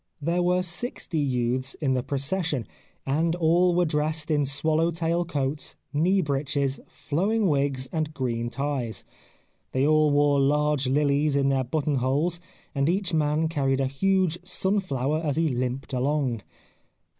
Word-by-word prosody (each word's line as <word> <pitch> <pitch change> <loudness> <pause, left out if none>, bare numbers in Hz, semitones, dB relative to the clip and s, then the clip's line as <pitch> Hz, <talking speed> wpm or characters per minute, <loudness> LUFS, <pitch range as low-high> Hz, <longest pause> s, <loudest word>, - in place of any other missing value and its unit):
There 170 +4 0
were 180 +1 +2
sixty 175 -1 -3
youths 130 -1 -1
in 135 -4 0
the 130 - +1
procession, 140 - -1 0.4
and 160 +5 +1
all 175 +1 +3
were 180 0 +3
dressed 155 +1 -1
in 145 -2 +2
swallow 155 +4 +1
tail 170 +1 -1
coats, 145 -2 -2 0.2
knee 180 +6 +3
breeches, 140 -2 -1
flowing 200 +8 0
wigs 140 -4 0
and 155 -1 -2
green 120 -5 -2
ties. 135 -3 -3 0.7
They 130 +1 +2
all 155 0 +4
wore 145 0 +3
large 145 0 +2
lilies 145 +1 +2
in 140 -1 +2
their 135 -1 +1
button 145 +2 -1
holes, 145 +7 0 0.3
and 140 +2 +1
each 185 0 0
man 155 0 +1
carried 135 -4 0
a 135 - +2
huge 175 +5 +1
sunflower 180 -7 -1
as 145 -3 0
he 165 -1 +2
limped 130 +1 -3
along. 130 -3 0
150 Hz, 145 wpm, -26 LUFS, 135-165 Hz, 0.7 s, all